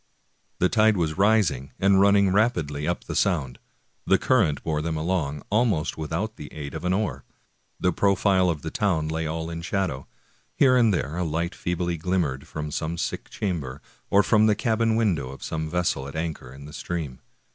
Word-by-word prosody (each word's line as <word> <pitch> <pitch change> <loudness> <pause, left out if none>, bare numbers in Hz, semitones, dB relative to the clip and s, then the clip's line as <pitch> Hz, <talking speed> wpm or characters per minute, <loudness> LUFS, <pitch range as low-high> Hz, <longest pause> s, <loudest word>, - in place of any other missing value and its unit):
The 90 - +3
tide 110 0 +3
was 80 0 -1
rising 100 - +2
and 95 0 +4
running 100 -1 +5
rapidly 80 -10 +1
up 85 - -1
the - - -6
Sound. 70 -10 0 0.5
The 95 - +5
current 95 - +2
bore 75 -2 -1
them 80 0 -2
along, 80 -4 -1
almost 105 -8 +1
without 80 +8 -3
the 75 - -9
aid 70 -2 -7
of 80 +2 -5
an 90 - +1
oar. 100 +2 -1 0.6
The 90 - +1
profile 95 -1 +3
of 75 -4 -3
the 80 - -4
town 85 -7 0
lay 80 0 -2
all 80 +1 -3
in 85 0 -5
shadow. 90 -7 -2 0.5
Here 130 -3 +5
and 120 -3 +4
there 85 -3 -2
a 90 - 0
light 85 +2 -2
feebly 85 -1 -2
glimmered 80 -6 -1
from 75 -1 -5
some 80 +3 -3
sick - - -4
chamber, 75 -9 -3 0.3
or 100 +1 +5
from 110 0 +4
the 105 - +4
cabin 115 -1 +1
window 90 - +1
of 70 - -10
some 80 -1 -3
vessel 90 -6 -1
at 70 - -9
anchor 80 -6 -4
in 70 +2 -11
the 75 - -11
stream. 80 -8 -4
85 Hz, 190 wpm, -25 LUFS, 75-100 Hz, 0.6 s, running